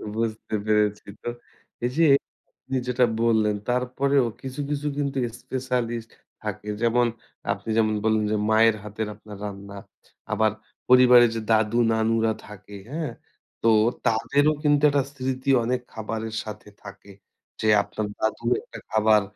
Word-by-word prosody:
বুঝতে 110 -1 -2
পেরেছি 105 -1 +1 0.2
তো। 120 - -2 0.6
এই - - +1
যে, 165 - +5 0.5
আপনি 130 0 -3
যেটা 125 0 +3 0.2
বললেন 110 -2 +3
তারপরেও 130 +2 +1 0.2
কিছু, 130 +1 -7
কিছু 150 0 -2
কিন্তু 140 -2 -1 0.2
স্পেশালিস্ট 120 -3 -3 0.3
থাকে। 105 - -5
যেমন 120 +1 +3 0.5
আপনি 100 +2 -10
যেমন 110 -1 +3
বললেন 110 -1 +2
যে, 110 - +1
মায়ের 110 0 +5
হাতের 105 +1 -4
আপনার 105 -1 -12
রান্না। 100 0 -8 0.6
আবার 110 -1 +2 0.4
পরিবারের 125 -2 +7
যে, 115 - -2
দাদু-নানুরা 110 0 +2
থাকে, 105 0 -11
হ্যাঁ? 160 0 -3 0.5
তো 115 - +5 0.4
তাদেরও 140 +7 +2
কিন্তু 145 -1 +3
একটা 140 -1 +2
স্মৃতি 130 0 -3
অনেক 125 +1 -1
খাবারের 110 0 -4
সাথে 105 -1 -9
থাকে। 100 0 -12 0.5
যে, 110 - 0 0.2
আপনার 105 +1 -4
দাদি 110 +2 -2 0.2
একটা - - -11
খাবার 110 -1 +4
115 Hz, 135 wpm, -25 LUFS, 110-125 Hz, 0.6 s, পরিবারের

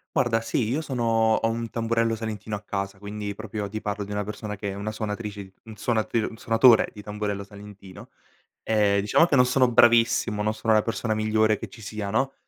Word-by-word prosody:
Guarda, 115 -2 +2
sì, 115 0 -1
io 140 +6 0
sono 130 -6 -3 0.3
ho 115 - 0
un 115 0 -4
tamburello 115 0 0
salentino 110 -1 -5
a 100 - -7
casa, 100 -1 -4
quindi 105 0 -5
proprio 105 0 -5
ti 110 +2 -6
parlo 105 0 -3
di 100 - -9
una 105 0 -1
persona 105 0 -6
che 100 0 -5
è - - -4
una 100 +2 -4
suonatrice 105 -3 -5
un 110 -1 -11
suonat 110 +1 -1 0.2
un 110 - -12
suonatore 115 0 +5
di 105 - -10
tamburello 105 -1 -4
salentino. 100 -2 -13 0.5
Ehm, 105 -2 +2
diciamo 105 +11 +4
che 145 -5 +2
non 125 - +6
sono 125 0 +3
bravissimo, 115 -2 +4
non 110 +1 0
sono 110 0 +1
la 110 - +5
persona 115 0 -2
migliore 110 0 +2
che 115 - -8
ci 105 - -14
sia 105 -1 -5
no, 130 +6 0
110 Hz, 205 wpm, -25 LUFS, 105-115 Hz, 0.5 s, non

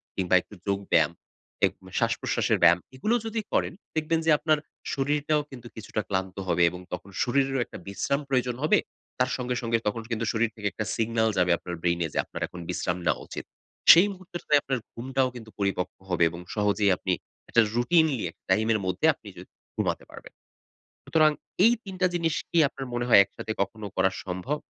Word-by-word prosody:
কিংবা 95 -1 +2
একটু 105 - -15
যোগ 100 0 +1
ব্যায়াম, 80 0 +4 0.5
এক - - +1 0.3
শ্বাসপ্রশ্বাসের - - +1
ব্যায়াম 85 +2 +7 0.2
এগুলো 215 - +1
যদি 225 0 -2
করেন, - - +1 0.2
দেখবেন 160 +1 +1
যে 160 - +4
আপনার 155 0 +2 0.4
শরীরটাও 150 +2 +1 0.3
কিছুটা 110 -1 -3
ক্লান্ত 95 -1 -2
হবে। 85 - +3
এবং 90 - -8
তখন 100 - -6
শরীরেরও 135 0 +1
একটা - - -10
বিশ্রাম 140 +8 -1
প্রয়োজন 125 -2 +1
হবে। 155 - +4 0.4
তার 125 0 +2
সঙ্গে, 125 0 -2
সঙ্গে 115 -1 +1
তখন 115 +2 -1
কিন্তু 115 0 -1
শরীর 115 0 +2
থেকে 105 -2 -3
একটা 110 - -4
সিগনাল 115 0 +1
যাবে 90 -1 +3
আপনার 90 0 -6
ব্রেইনে 85 -1 +1
যে - - -4
আপনার - - -8
এখন 90 - -10
বিশ্রাম 90 0 -1
নেওয়া 75 -4 +1
উচিত। - - -7 0.5
সেই 175 +5 +8
মুহূর্তে 185 -1 -8
যেয়ে 145 -1 +4
আপনার 135 -2 -1
ঘুমটাও 130 +2 0
কিন্ত 115 -2 -9
পরিপক্ক 95 -2 -1 0.2
হবে 85 -1 +2
এবং 85 +1 -8 0.2
সহজেই 105 -1 +2
আপনি 95 - -1 0.4
একটা 115 - +5
রুটিনলি 150 +1 +3
এক - - -35
টাইমের 110 +3 +3
মদ্ধে 95 0 0
আপনি - - -17
য - - -8 0.4
ঘুমাতে - - -1
পারবেন। - - -12 0.7
সুতরাং 155 -1 +4 0.3
এই 230 - +7
৩ 195 - -7
টা 185 - +5
জিনিস 165 -2 +1 0.2
কি 170 - +2
আপনার 135 -1 -7
মনে 120 0 0
হয় 105 - +9
একসাথে 110 - -6
কখনো 105 +1 -5
করা 95 0 +3
সম্ভব? 95 +11 -3
115 Hz, 180 wpm, -27 LUFS, 95-145 Hz, 0.7 s, হয়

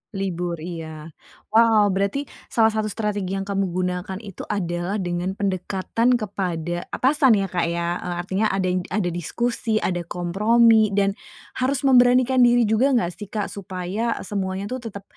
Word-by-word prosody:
Libur. 180 -3 -2
Iya. 160 -2 -7 0.4
Wow, 220 -3 +5
berarti 200 +9 0 0.2
salah 225 -1 +3
satu 215 0 -1
strategi 205 -3 -2
yang 195 - -2
kamu 195 -1 -1
gunakan 180 +1 -3
itu 200 -4 -8
adalah 175 -1 -2
dengan 175 +2 -2
pendekatan 200 +5 0
kepada 175 -6 -3
atasan 265 -3 +4
ya 195 - -1
Kak 175 -2 0
ya. 170 +1 -2
Eee, 175 -1 -4
artinya 195 +4 0
ada 190 -2 0
id 180 -1 -2
ada 185 -2 -1
diskusi, 220 +6 -1
ada 175 -1 0
kompromi, 215 +5 +3
dan 200 -1 +3 0.5
harus 260 +2 0
memberanikan 255 -1 +5
diri 245 -1 +5
juga 230 +6 +2
gak 180 -7 +1
sih 205 - -7
Kak, 210 0 -3
supaya 195 +4 -3
semuanya 195 0 -3
tuh 255 - -3
tetap 200 -2 -8
195 Hz, 155 wpm, -23 LUFS, 180-225 Hz, 0.5 s, Wow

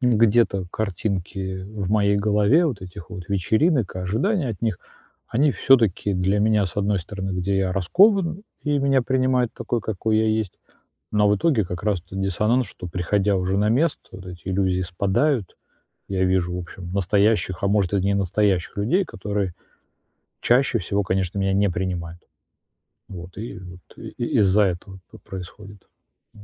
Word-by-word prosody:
где-то 115 -5 +3
картинки 95 -2 -3
в 100 -1 -5
моей 100 -1 +3
голове 105 - +3
вот 120 - -3
этих 90 -3 -10
вот 90 -3 -8
вечеринок 110 - +1
и - - -4
ожидания 135 - 0
от 110 -5 -5
них. 110 -6 0 0.5
Они 140 +4 +3
всё-таки 115 -8 +3
для 95 +3 +1
меня, 105 -1 +3
с 90 - -9
одной 105 0 +1
стороны, 95 +2 -5
где 95 +1 -1
я 95 -1 0
раскован, 180 - +3 0.2
и 145 -1 +1
меня 135 -1 +3
принимают 130 -1 +1
такой, 120 - -2
какой 110 +1 -1
я 110 0 +2
есть. 110 -3 -1 0.6
Но 105 -1 +3
в 105 - +3
итоге 130 -4 +2
как 90 -1 -6
раз 105 -4 +1
то 95 +2 -11
диссонанс, 105 +6 +1
что 90 -2 -9
приходя 95 +4 0
уже 95 +1 0
на 105 +1 +2
место, 145 +8 +1
вот 95 0 -11
эти 90 0 -9
иллюзии 95 -1 +1
спадают 100 - 0 0.5
и - - -4
я 95 0 +2
вижу, 90 -1 +1
в - - -3
общем, 90 0 -9
настоящих, 100 0 +1
а - - +3
может, 100 -2 +1
и 100 - +2
не 100 +2 +1
настоящих 100 -1 0
людей, 165 - +1
которые 100 - -3 0.9
чаще 125 0 +3
всего, 100 +2 -1
конечно, 95 0 -1
меня 95 0 +1
не 100 +1 +2
принимают. 85 -2 -4 0.9
Вот. 90 -1 -9
И 115 - -6
вот 90 -1 -11 0.2
и - - -8 0.3
из-за 100 +1 +4
этого 95 0 -3
п - - -12
происходит. 100 +1 -10 0.5
Вот. 105 - -15
100 Hz, 170 wpm, -23 LUFS, 95-110 Hz, 0.9 s, из-за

